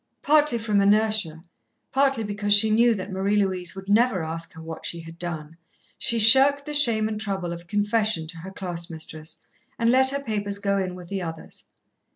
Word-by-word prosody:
Partly 300 Hz, -4 st, +3 dB
from 215 Hz, -3 st, +1 dB
inertia, 205 Hz, -5 st, +1 dB, 0.5 s
partly 270 Hz, -3 st, +2 dB
because 205 Hz, 0 st, +2 dB
she 215 Hz, +1 st, +4 dB
knew 230 Hz, +1 st, +4 dB
that 195 Hz, 0 st, -6 dB
Marie 195 Hz, +2 st, 0 dB
Louise 185 Hz, -3 st, -1 dB
would 190 Hz, 0 st, -9 dB
never 205 Hz, -3 st, +2 dB
ask 165 Hz, +2 st, -4 dB
her 160 Hz, -, -12 dB
what 160 Hz, 0 st, -8 dB
she 170 Hz, -, -3 dB
had 165 Hz, +1 st, -12 dB
done, 165 Hz, -3 st, -5 dB, 0.4 s
she 235 Hz, -, +1 dB
shirked 270 Hz, +6 st, +5 dB
the 300 Hz, -, -5 dB
shame 230 Hz, -7 st, +2 dB
and 215 Hz, -1 st, -4 dB
trouble 190 Hz, -5 st, -3 dB
of 170 Hz, 0 st, -10 dB
confession 210 Hz, -3 st, 0 dB
to 165 Hz, +2 st, -8 dB
her 170 Hz, +4 st, -8 dB
class 180 Hz, -3 st, -6 dB
mistress, 160 Hz, -1 st, -6 dB, 0.4 s
and 230 Hz, 0 st, +2 dB
let 265 Hz, +1 st, +5 dB
her 280 Hz, +1 st, -2 dB
papers 205 Hz, -4 st, -2 dB
go 200 Hz, 0 st, 0 dB
in 185 Hz, -1 st, -3 dB
with 180 Hz, -1 st, -11 dB
the 195 Hz, -1 st, -3 dB
others. 165 Hz, -2 st, -8 dB
200 Hz, 195 wpm, -24 LUFS, 175-220 Hz, 0.5 s, shirked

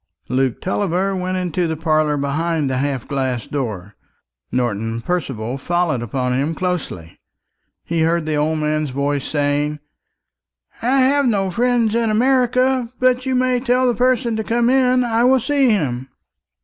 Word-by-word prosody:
Luke 130 Hz, -1 st, 0 dB
Tulliver 190 Hz, 0 st, -1 dB
went 185 Hz, 0 st, -2 dB
into 180 Hz, -1 st, -1 dB
the 160 Hz, -1 st, -3 dB
parlour 155 Hz, -2 st, +1 dB
behind 150 Hz, +1 st, -1 dB
the 130 Hz, -, -1 dB
half 135 Hz, -3 st, -2 dB
glass 130 Hz, -4 st, -2 dB
door, 105 Hz, -8 st, -5 dB, 0.6 s
Norton 115 Hz, -2 st, -1 dB
Percival 135 Hz, -6 st, -3 dB
following 175 Hz, -4 st, 0 dB
upon 125 Hz, +2 st, -2 dB
him 140 Hz, +5 st, -1 dB
closely. 170 Hz, -, -4 dB, 0.7 s
He 165 Hz, -1 st, -1 dB
heard 165 Hz, 0 st, +1 dB
the 155 Hz, -, -2 dB
old 155 Hz, +2 st, 0 dB
man's 155 Hz, -1 st, -1 dB
voice 140 Hz, +1 st, -1 dB
saying, 145 Hz, 0 st, 0 dB, 1.0 s
"I 260 Hz, +3 st, +2 dB
have 280 Hz, +1 st, +3 dB
no 195 Hz, -5 st, +1 dB
friend 235 Hz, +1 st, +1 dB
in 230 Hz, -1 st, +1 dB
America; 255 Hz, +1 st, +2 dB
but 255 Hz, 0 st, +2 dB
you 260 Hz, -, +1 dB
may 255 Hz, 0 st, +2 dB
tell 250 Hz, +1 st, +1 dB
the 245 Hz, -, +2 dB
person 240 Hz, 0 st, +1 dB
to 220 Hz, -, -2 dB
come 235 Hz, +2 st, +1 dB
in; 255 Hz, -1 st, +3 dB
I 230 Hz, -1 st, +1 dB
will 260 Hz, +1 st, +4 dB
see 270 Hz, +1 st, +2 dB
him." 135 Hz, -, -1 dB
170 Hz, 155 wpm, -19 LUFS, -, 1.0 s, will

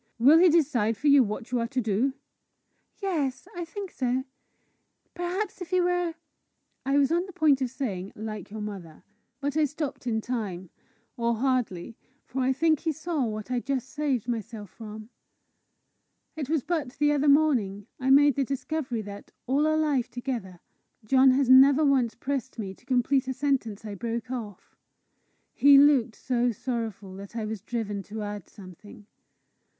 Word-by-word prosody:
"Will 280 Hz, +8 st, +7 dB
he 360 Hz, +1 st, +7 dB
decide 260 Hz, -10 st, +2 dB
for 285 Hz, -, -9 dB
you 280 Hz, -1 st, +7 dB
what 220 Hz, +1 st, -3 dB
you 250 Hz, -, +1 dB
are 230 Hz, -, -1 dB
to 260 Hz, +2 st, -2 dB
do?" 235 Hz, +4 st, 0 dB, 0.9 s
"Yes 295 Hz, -6 st, -1 dB
I 350 Hz, -, -3 dB
think 390 Hz, +3 st, -7 dB
so. 255 Hz, 0 st, -1 dB, 0.9 s
Perhaps 365 Hz, +3 st, -3 dB
if 355 Hz, -, -6 dB
he 365 Hz, 0 st, +2 dB
were 355 Hz, -2 st, 0 dB, 0.3 s
" -, -, -49 dB
I -, -, +4 dB
was 280 Hz, +1 st, +3 dB
on 345 Hz, +3 st, +1 dB
the -, -, -9 dB
point 310 Hz, -6 st, +3 dB
of 255 Hz, -, 0 dB
saying, 200 Hz, -8 st, -4 dB
"like 215 Hz, 0 st, -6 dB
your 215 Hz, +1 st, -7 dB
mother," 190 Hz, -6 st, -8 dB, 0.4 s
but 285 Hz, 0 st, -2 dB
I 310 Hz, -1 st, +3 dB
stopped 295 Hz, -3 st, -5 dB
in 220 Hz, -2 st, +1 dB
time 205 Hz, -7 st, -4 dB, 0.5 s
or 235 Hz, 0 st, +1 dB
hardly, 235 Hz, -5 st, -1 dB, 0.3 s
for 265 Hz, -, -3 dB
I 255 Hz, +1 st, +2 dB
think 310 Hz, +2 st, +2 dB
he 325 Hz, -, -1 dB
saw 315 Hz, -2 st, -2 dB
what 215 Hz, +1 st, -5 dB
I 250 Hz, -, +1 dB
just 260 Hz, 0 st, -3 dB
saved 285 Hz, -7 st, -1 dB
myself 220 Hz, -4 st, -5 dB
from. 215 Hz, -1 st, -10 dB, 1.3 s
It 295 Hz, -4 st, -5 dB
was 315 Hz, -5 st, +1 dB
but 315 Hz, -8 st, -2 dB
the 295 Hz, +1 st, +3 dB
other 290 Hz, 0 st, +2 dB
morning 245 Hz, -10 st, +2 dB
I 260 Hz, 0 st, -1 dB
made 285 Hz, +1 st, +6 dB
the 275 Hz, -, 0 dB
discovery 270 Hz, -3 st, -3 dB
that, 205 Hz, 0 st, -10 dB
all 280 Hz, +4 st, +2 dB
our 310 Hz, 0 st, +2 dB
life 290 Hz, -6 st, +1 dB
together, 235 Hz, -8 st, -5 dB, 0.4 s
John 265 Hz, +4 st, +5 dB
has 265 Hz, 0 st, +3 dB
never 270 Hz, +3 st, +7 dB
once 260 Hz, -5 st, +2 dB
pressed 265 Hz, 0 st, -4 dB
me 195 Hz, -4 st, -5 dB
to 240 Hz, -, -24 dB
complete 260 Hz, +1 st, +2 dB
a 260 Hz, -, -2 dB
sentence 255 Hz, -6 st, -1 dB
I 210 Hz, -, -5 dB
broke 235 Hz, +4 st, -4 dB
off. 215 Hz, -7 st, -7 dB, 0.8 s
He 280 Hz, 0 st, +7 dB
looked 275 Hz, -6 st, +5 dB
so 245 Hz, -1 st, 0 dB
sorrowful 220 Hz, -4 st, -4 dB
that 200 Hz, +3 st, -10 dB
I 225 Hz, -2 st, -2 dB
was 215 Hz, -2 st, -5 dB
driven 215 Hz, -3 st, -3 dB
to 215 Hz, +1 st, -6 dB
add 205 Hz, -2 st, -6 dB
something. 200 Hz, +2 st, -13 dB
255 Hz, 175 wpm, -27 LUFS, 220-285 Hz, 1.3 s, Will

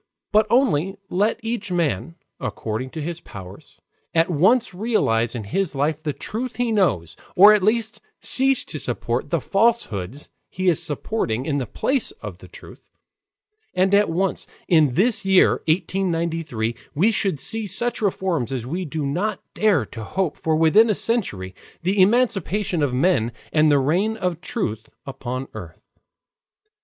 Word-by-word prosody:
But 215 Hz, +1 st, +4 dB
only 195 Hz, -, +2 dB, 0.2 s
let 210 Hz, +5 st, +1 dB
each 225 Hz, -4 st, -3 dB
man, 170 Hz, -1 st, -1 dB, 0.2 s
according 115 Hz, +4 st, -4 dB
to 155 Hz, +2 st, -6 dB
his 170 Hz, +1 st, -4 dB
powers, 95 Hz, -, -12 dB, 0.4 s
at 165 Hz, +3 st, +3 dB
once 195 Hz, -, +3 dB
realize 130 Hz, -, 0 dB
in 115 Hz, -, -4 dB
his 155 Hz, -, -2 dB
life 150 Hz, +3 st, 0 dB
the 155 Hz, -2 st, -2 dB
truth 235 Hz, -, -5 dB
he 240 Hz, 0 st, 0 dB
knows, 100 Hz, -, +1 dB, 0.2 s
or 205 Hz, +3 st, +9 dB
at 210 Hz, -, +3 dB
least 220 Hz, +3 st, 0 dB, 0.2 s
cease 270 Hz, 0 st, +2 dB
to -, -, -6 dB
support -, -, -2 dB
the -, -, +1 dB
falsehoods 150 Hz, -, -1 dB, 0.2 s
he 185 Hz, 0 st, 0 dB
is 165 Hz, -, +1 dB
supporting 145 Hz, -, -2 dB
in 145 Hz, -3 st, 0 dB
the 125 Hz, -, -4 dB
place 265 Hz, -, 0 dB
of 445 Hz, -, -9 dB
the -, -, -13 dB
truth, -, -, -14 dB, 0.9 s
and 190 Hz, +2 st, +2 dB
at 205 Hz, -1 st, +4 dB
once, 185 Hz, +3 st, -1 dB, 0.2 s
in 155 Hz, -7 st, +3 dB
this 215 Hz, -, +3 dB
year 190 Hz, -1 st, +4 dB
1893, 165 Hz, -, -1 dB, 0.2 s
we 195 Hz, +10 st, +3 dB
should 195 Hz, -8 st, 0 dB
see 220 Hz, +8 st, +1 dB
such 235 Hz, +6 st, 0 dB
reforms 185 Hz, -, -1 dB
as 125 Hz, -3 st, -3 dB
we 175 Hz, +8 st, -3 dB
do 155 Hz, -1 st, -3 dB
not 185 Hz, +9 st, -1 dB
dare 200 Hz, -, +2 dB
to 115 Hz, +1 st, -8 dB
hope 175 Hz, -, -2 dB
for 160 Hz, -1 st, -1 dB
within 165 Hz, +9 st, +5 dB
a 210 Hz, -, +2 dB
century 105 Hz, -, -1 dB, 0.3 s
the 190 Hz, +2 st, +2 dB
emancipation 205 Hz, -4 st, +1 dB
of 145 Hz, -3 st, +1 dB
men 125 Hz, -4 st, +1 dB, 0.2 s
and 155 Hz, -1 st, +4 dB
the 145 Hz, -, +5 dB
reign 180 Hz, +11 st, +1 dB
of 180 Hz, -4 st, -2 dB
truth 110 Hz, -, -4 dB, 0.2 s
upon 130 Hz, -1 st, -5 dB
earth. -, -, -10 dB
180 Hz, 155 wpm, -22 LUFS, 140-210 Hz, 0.9 s, or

